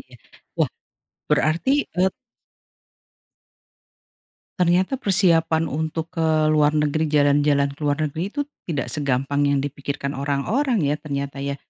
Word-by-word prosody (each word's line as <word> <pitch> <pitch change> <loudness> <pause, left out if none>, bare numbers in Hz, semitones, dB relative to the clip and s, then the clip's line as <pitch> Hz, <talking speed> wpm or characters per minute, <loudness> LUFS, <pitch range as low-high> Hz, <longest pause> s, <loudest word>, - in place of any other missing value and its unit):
iya, 125 -1 -17 0.4
wah - - +2 0.6
berarti 155 - +1 0.3
e - - +1 2.6
Ternyata 180 +8 +2
persiapan 165 - +3
untuk 160 +3 -3
ke 165 -2 -1 0.2
luar 150 0 +3
negeri, 150 +1 +1
jalan-jalan 145 -1 +3
ke 140 - -15
luar 145 -1 +1
negeri 155 +3 -3
itu 285 +8 -3 0.3
tidak 150 -5 -2
segampang 140 0 0
yang 140 -1 +2
dipikirkan 140 0 -4
orang-orang 160 - 0
ya, 145 +1 +1
ternyata 140 -2 -4
ya. 140 0 -3
150 Hz, 120 wpm, -22 LUFS, 140-165 Hz, 2.6 s, persiapan